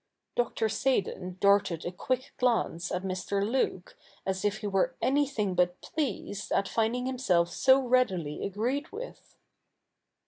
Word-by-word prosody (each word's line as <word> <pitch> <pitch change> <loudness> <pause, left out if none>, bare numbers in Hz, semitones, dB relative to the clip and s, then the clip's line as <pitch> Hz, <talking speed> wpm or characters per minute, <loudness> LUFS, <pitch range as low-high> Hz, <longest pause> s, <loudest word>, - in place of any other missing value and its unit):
Dr. 230 -2 +1
Seydon 195 -7 -1
darted 200 -4 +3
a 175 - -2
quick 255 +8 -2
glance 230 -8 +1
at 180 +1 -2
Mr. 195 +2 -1
Luke, 225 -7 -1 0.3
as 190 -1 -2
if 205 0 +1
he - - -5
were 200 +6 +1
anything 265 -8 +1
but 180 0 +1
pleased 205 -8 -3
at 195 - +2
finding 235 +3 0
himself 185 -10 +1
so 265 +6 +5
readily 240 - +1
agreed 245 - -2
with. 485 +4 -9
205 Hz, 135 wpm, -29 LUFS, 185-255 Hz, 0.3 s, so